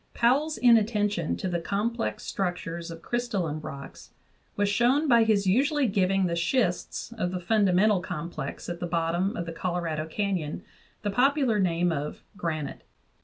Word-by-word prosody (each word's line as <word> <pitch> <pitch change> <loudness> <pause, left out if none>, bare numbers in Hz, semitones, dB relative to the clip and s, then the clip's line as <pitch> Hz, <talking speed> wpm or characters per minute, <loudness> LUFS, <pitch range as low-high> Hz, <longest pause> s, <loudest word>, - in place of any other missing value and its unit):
Powell's 285 +6 +2
inatten 220 -3 +4
tion 170 -6 -2
to - - -3
the 175 -1 -1
complex 220 +7 -2
structures 170 -2 -3
of 165 0 -9
crystalline 200 -11 -2
rocks 140 -2 -9 0.5
was 205 0 +1
shown 245 +9 +3
by 235 -3 +6
his 210 -3 +2
usually 275 - +3
giving 195 -3 +2
the 170 -1 0
schists 180 +4 -1
of 180 - 0
the 180 0 -3
fundamental 200 +1 +3
complex 170 -5 -5
at 175 -1 -4
the 175 - -3
bottom 170 +5 0
of 170 - -3
the 165 - -6
Colorado 165 -3 -2
Canyon 180 -3 -2 0.4
the 205 - 0
popular 260 -1 +3
name 175 -2 +2
of 150 -1 -4
"granite." 155 -6 -3
190 Hz, 155 wpm, -27 LUFS, 170-225 Hz, 0.5 s, by